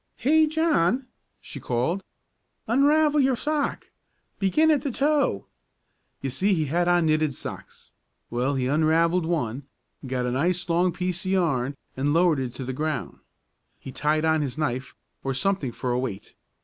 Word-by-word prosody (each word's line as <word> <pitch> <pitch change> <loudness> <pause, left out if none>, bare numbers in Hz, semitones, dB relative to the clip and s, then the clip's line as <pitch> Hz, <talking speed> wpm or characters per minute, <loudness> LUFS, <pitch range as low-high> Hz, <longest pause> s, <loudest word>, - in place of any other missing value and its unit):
"'Hey, 310 +4 +3
John!' 300 - +1 0.3
she - - -9
called 130 +11 -1 0.6
'unravel 295 +5 +3
your 265 -2 +3
sock. 295 +2 -2 0.5
Begin 305 +12 +3
at 295 -4 +2
the 280 - -2
toe!' 280 - +1 0.8
You 135 - -3
see 195 +8 +1
he 155 -3 0
had 170 +5 0
on 175 -1 +3
knitted 155 -3 +1
socks. - - -9 0.4
Well, 125 +4 0
he 130 -1 0
unravelled 160 +4 +2
one, 140 -5 -2 0.4
got 125 -1 -1
a 125 - -1
nice 175 +8 0
long 175 +1 +2
piece 180 +1 -3
of - - -1
yarn 140 -8 +1 0.2
and 140 +2 0
lowered 170 -4 +3
it 130 -2 -4
to 130 - -6
the 130 - -4
ground. 155 +1 -3 0.6
He 135 - -9
tied 155 +4 0
on 160 -1 +2
his 140 -1 -3
knife, 130 -4 -2 0.3
or 135 -1 -2
something 150 -3 0
for 125 +2 -3
a 120 - +1
weight. 115 -7 -5
160 Hz, 160 wpm, -25 LUFS, 135-195 Hz, 0.8 s, Hey